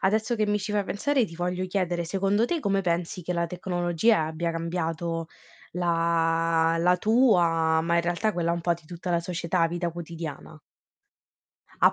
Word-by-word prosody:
adesso 220 Hz, +5 st, +1 dB
che 215 Hz, -2 st, 0 dB
mi 210 Hz, 0 st, +1 dB
ci 205 Hz, +1 st, -4 dB
fai 205 Hz, -1 st, +1 dB
pensare 250 Hz, +5 st, 0 dB
ti 165 Hz, -, -11 dB
voglio 180 Hz, +1 st, -2 dB
chiedere: 180 Hz, -2 st, -1 dB
secondo 195 Hz, +5 st, +1 dB
te 340 Hz, -, -1 dB
come 195 Hz, -7 st, 0 dB
pensi 175 Hz, 0 st, -2 dB
che 180 Hz, +2 st, -3 dB
la 170 Hz, 0 st, 0 dB
tecnologia 175 Hz, +2 st, +1 dB
abbia 160 Hz, +2 st, -2 dB
cambiato 165 Hz, 0 st, -3 dB, 0.5 s
la 165 Hz, -1 st, +1 dB
la 180 Hz, +2 st, +3 dB
tua 175 Hz, -8 st, +3 dB
ma 170 Hz, +1 st, +1 dB
in -, -, +4 dB
realtà 175 Hz, +6 st, 0 dB
quella 170 Hz, -2 st, -1 dB
un 170 Hz, -, -2 dB
po' 175 Hz, -, +2 dB
di 170 Hz, -2 st, -8 dB
tutta 175 Hz, +2 st, -6 dB
la 170 Hz, -, +2 dB
società, 170 Hz, 0 st, 0 dB
vita 175 Hz, +1 st, -2 dB
quotidiana? 165 Hz, -2 st, -7 dB, 1.3 s
A -, -, +7 dB
175 Hz, 170 wpm, -26 LUFS, 165-190 Hz, 1.3 s, A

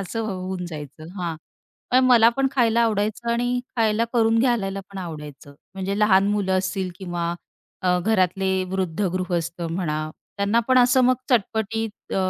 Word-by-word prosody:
असं 195 Hz, +4 st, -4 dB
होऊन 185 Hz, -2 st, -4 dB
जायचं. 155 Hz, -1 st, -9 dB
हां, 170 Hz, -3 st, -3 dB, 0.5 s
पण 255 Hz, +1 st, +5 dB
मला 235 Hz, -3 st, +7 dB
पण 270 Hz, 0 st, +2 dB
खायला 235 Hz, -3 st, +3 dB
आवडायचं 220 Hz, +1 st, 0 dB
आणि 245 Hz, +1 st, 0 dB, 0.2 s
खायला 220 Hz, 0 st, +2 dB
करून 225 Hz, -1 st, +3 dB
घालायला 215 Hz, -6 st, +1 dB
पण 195 Hz, -, -8 dB
आवडायचं. 150 Hz, -5 st, -8 dB, 0.2 s
म्हणजे 195 Hz, +1 st, -3 dB
लहान 200 Hz, -2 st, +4 dB
मुलं 190 Hz, -2 st, +1 dB
असतील 185 Hz, 0 st, -2 dB
किंवा 175 Hz, -2 st, -3 dB, 0.5 s
अ, 180 Hz, 0 st, +3 dB
घरातले 190 Hz, -1 st, +1 dB, 0.2 s
वृद्ध 185 Hz, -2 st, -2 dB
गृहस्थ 175 Hz, -2 st, -2 dB
म्हणा, 165 Hz, -2 st, -2 dB, 0.4 s
त्यांना 200 Hz, +3 st, +2 dB
पण 255 Hz, 0 st, +5 dB
असं 250 Hz, +1 st, +5 dB
मग 255 Hz, +1 st, +5 dB, 0.2 s
चटपटीत 220 Hz, -1 st, -1 dB
अ, -, -, 0 dB
195 Hz, 150 wpm, -23 LUFS, 180-225 Hz, 0.5 s, मला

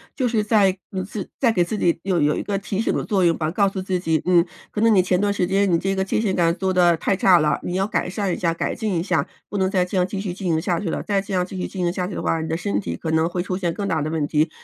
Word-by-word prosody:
就 260 Hz, -4 st, 0 dB
是 225 Hz, -3 st, +1 dB
在 205 Hz, -3 st, +3 dB
嗯， 185 Hz, -1 st, -3 dB
自 195 Hz, 0 st, -6 dB
在 240 Hz, -4 st, +3 dB
给 180 Hz, -5 st, +2 dB
自 190 Hz, +5 st, -3 dB
己 170 Hz, -4 st, +1 dB
有 185 Hz, -3 st, +1 dB
有 150 Hz, +1 st, +2 dB
一 -, -, -3 dB
个 200 Hz, -1 st, -2 dB
提 195 Hz, 0 st, -4 dB
醒 225 Hz, -, +1 dB
的 -, -, -1 dB
作 195 Hz, -3 st, +1 dB
用 165 Hz, -1 st, +3 dB
吧， 155 Hz, -1 st, -1 dB
告 200 Hz, +3 st, +2 dB
诉 195 Hz, -1 st, -3 dB
自 185 Hz, -1 st, -1 dB
己， 160 Hz, -3 st, 0 dB
嗯， 175 Hz, -1 st, +4 dB, 0.3 s
可 -, -, -4 dB
能 225 Hz, 0 st, +5 dB
你 190 Hz, -, +6 dB
前 180 Hz, 0 st, +1 dB
段 205 Hz, +1 st, +1 dB
时 185 Hz, -, 0 dB
间， 195 Hz, +2 st, +2 dB
你 170 Hz, -, +4 dB
这 195 Hz, +3 st, -1 dB
个 190 Hz, -, 0 dB
界 190 Hz, -, -1 dB
限 200 Hz, -4 st, 0 dB
感 170 Hz, -1 st, +2 dB
做 190 Hz, 0 st, -1 dB
得 175 Hz, -2 st, +4 dB
太 195 Hz, -, 0 dB
差 185 Hz, -1 st, +5 dB
了， 150 Hz, -1 st, +1 dB
你 180 Hz, -, -3 dB
要 190 Hz, +1 st, +1 dB
改 195 Hz, -, -1 dB
善 195 Hz, 0 st, -2 dB
一 -, -, -3 dB
下、 170 Hz, -2 st, 0 dB
改 165 Hz, -, -2 dB
进 215 Hz, -4 st, -2 dB
一 -, -, -2 dB
下， -, -, 0 dB, 0.2 s
不 205 Hz, -, -3 dB
能 190 Hz, -1 st, +1 dB
再 190 Hz, -2 st, +2 dB
这 185 Hz, +2 st, -3 dB
样 180 Hz, 0 st, +2 dB
继 195 Hz, -, -4 dB
续 195 Hz, -3 st, -3 dB
进 185 Hz, -1 st, -4 dB
行 160 Hz, -1 st, +1 dB
下 170 Hz, 0 st, 0 dB
去 180 Hz, -, -3 dB
了， -, -, -3 dB
再 200 Hz, -2 st, 0 dB
这 200 Hz, 0 st, -7 dB
样 180 Hz, -1 st, +1 dB
继 190 Hz, +1 st, -8 dB
续 -, -, -2 dB
进 185 Hz, -2 st, -4 dB
行 175 Hz, -, +1 dB
下 180 Hz, 0 st, -3 dB
去 190 Hz, -, -6 dB
的 -, -, -3 dB
话， 165 Hz, -, 0 dB
你 160 Hz, -, -4 dB
的 160 Hz, -, -1 dB
身 100 Hz, -, -1 dB
体 85 Hz, -4 st, -4 dB
可 160 Hz, -, -4 dB
能 160 Hz, +1 st, +2 dB
会 175 Hz, 0 st, -2 dB
出 185 Hz, -1 st, -3 dB
现 175 Hz, -3 st, -1 dB
更 200 Hz, +2 st, -3 dB
大 165 Hz, -5 st, 0 dB
的 150 Hz, -, -2 dB
问 155 Hz, -2 st, -1 dB
题。 155 Hz, +2 st, +1 dB
185 Hz, 365 characters per minute, -22 LUFS, 170-195 Hz, 0.3 s, 你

